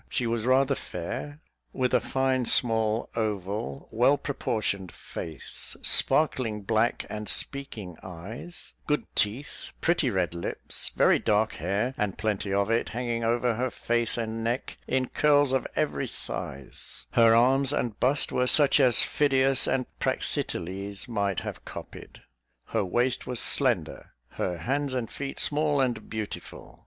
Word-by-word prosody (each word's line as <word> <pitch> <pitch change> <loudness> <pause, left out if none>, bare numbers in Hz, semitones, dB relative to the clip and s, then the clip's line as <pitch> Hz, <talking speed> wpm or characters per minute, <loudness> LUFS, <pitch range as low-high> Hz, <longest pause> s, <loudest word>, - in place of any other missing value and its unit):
She 125 - -1
was 115 0 -1
rather 135 +2 +4
fair, 130 +8 -6 0.4
with 130 -1 0
a - - +5
fine, 130 -2 0
small, 110 -2 +3
oval, 105 +2 -3
well 125 +6 +4
proportioned 100 - -2
face, 80 -2 -6
sparkling 120 -9 +2
black 110 +3 +1
and 105 -1 -6
speaking 110 - -3
eyes, 100 - -9
good 150 -1 0
teeth, 115 +8 -1
pretty 170 -5 +2
red 90 -6 0
lips, 85 - -1
very - - +4
dark 110 +1 +2
hair, 100 - -1
and 105 -3 -1
plenty 105 -2 -2
of 100 +2 +1
it, 115 - +1
hanging 120 -1 -2
over 120 +1 +1
her 125 +3 -1
face 120 0 0
and 115 -1 -3
neck 120 +3 -2
in 130 -1 0
curls 145 -2 +3
of 130 -1 0
every - - -1
size; 70 -1 -5
her 115 -1 +6
arms 135 +3 +4
and 120 -7 -2
bust 135 +3 +1
were 125 0 +1
such 145 +1 +6
as 125 -5 +5
Phidias 135 -2 +3
and 130 -1 +1
Praxiteles 100 +5 -2
might 100 -6 -1
have - - -7
copied; - - -10 0.5
her - - 0
waist 120 +7 0
was 125 -2 0
slender; - - 0 0.2
her 90 -1 -3
hands 135 - -1
and 120 -3 -3
feet 140 -1 -5
small 150 -1 +2
and 125 -3 -1
beautiful. 110 -1 -7
115 Hz, 145 wpm, -27 LUFS, 105-130 Hz, 0.5 s, her